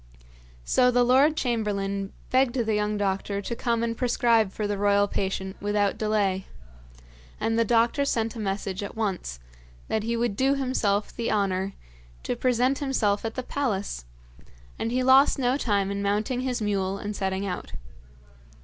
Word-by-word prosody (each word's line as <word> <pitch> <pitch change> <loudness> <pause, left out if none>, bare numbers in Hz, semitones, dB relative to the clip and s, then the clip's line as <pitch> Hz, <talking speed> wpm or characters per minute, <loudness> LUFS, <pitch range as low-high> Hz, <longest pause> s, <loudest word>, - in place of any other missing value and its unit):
So 250 -1 +4
the 245 0 +3
lord 270 +6 +4
chamberlain 200 -5 -1 0.2
begged 260 -1 +3
the 225 -4 0
young 210 0 0
doctor 200 0 -1
to 220 +4 -4
come 235 -1 0
and 230 0 -1
prescribe 235 -4 +2
for 210 - -3
the 205 0 -1
royal 205 0 +3
patient 190 -1 -3
without 205 -1 +1
delay; 205 -3 0 0.9
and 225 - 0
the - - +5
doctor 235 +5 +2
sent 230 -5 -1
a - - -6
message 195 -2 -3
at 200 - -6
once, 195 - -2 0.5
that 220 - 0
he 230 +2 -1
would 235 -3 0
do 270 +5 +2
himself 225 -7 0
the 235 - -2
honour 195 -2 0 0.5
to - - -2
present 250 +2 +1
himself 225 -8 0
at 225 - -3
the 255 - -3
palace, 205 - -2 0.7
and 230 - -1
he 255 +1 +1
lost 265 +3 +6
no 255 -1 +1
time 200 -7 0
in 200 0 -2
mounting 210 +5 0
his 250 -3 -2
mule 195 -2 0
and 205 +1 -5
setting 190 0 -2
out. 180 -2 -5
215 Hz, 165 wpm, -26 LUFS, 200-245 Hz, 0.9 s, lost